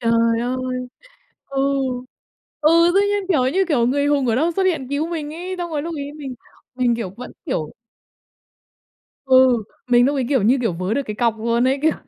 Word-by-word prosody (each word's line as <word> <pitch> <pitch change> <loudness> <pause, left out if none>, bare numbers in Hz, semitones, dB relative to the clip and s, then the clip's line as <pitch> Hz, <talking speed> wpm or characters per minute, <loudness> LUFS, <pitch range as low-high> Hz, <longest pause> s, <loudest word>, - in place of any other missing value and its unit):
Trời 230 0 +2
ơi! 255 +1 -3 0.6
Ừ. 275 0 -5 1.0
Ừ, 335 +3 +5
tự 395 - +5
nhiên 410 -1 0
kiểu 260 -8 +2
như, 385 +1 +3
kiểu, 250 -7 +2
người 285 +3 +1
hùng 290 -2 +2
ở 230 - +2
đâu 320 +8 +1
xuất 390 - +2
hiện 320 -9 0
cứu 295 +3 -1
mình 310 -3 -5
ấy, 360 +3 -5
xong 345 -1 -4
rồi 300 -2 -2
lúc 335 +2 -5
ấy 285 0 -5
mình 285 -4 -7 0.4
mình, 245 -2 +1
kiểu, 210 -6 -4
vẫn, 250 +1 -9
kiểu 155 -1 -3 1.5
Ừ, 260 -3 +5 0.3
mình 245 0 +5
lúc 285 +1 0
ấy 265 - 0
kiểu 265 -6 +2
như, 245 +6 +3
kiểu, 225 -6 0
vớ 185 +5 -2
được 280 - 0
cái 215 - -5
cọc 230 -2 +1
luôn 235 +2 +1
ấy. 270 +1 +1
Kiểu 315 0 +4
260 Hz, 205 wpm, -21 LUFS, 235-305 Hz, 1.5 s, Ừ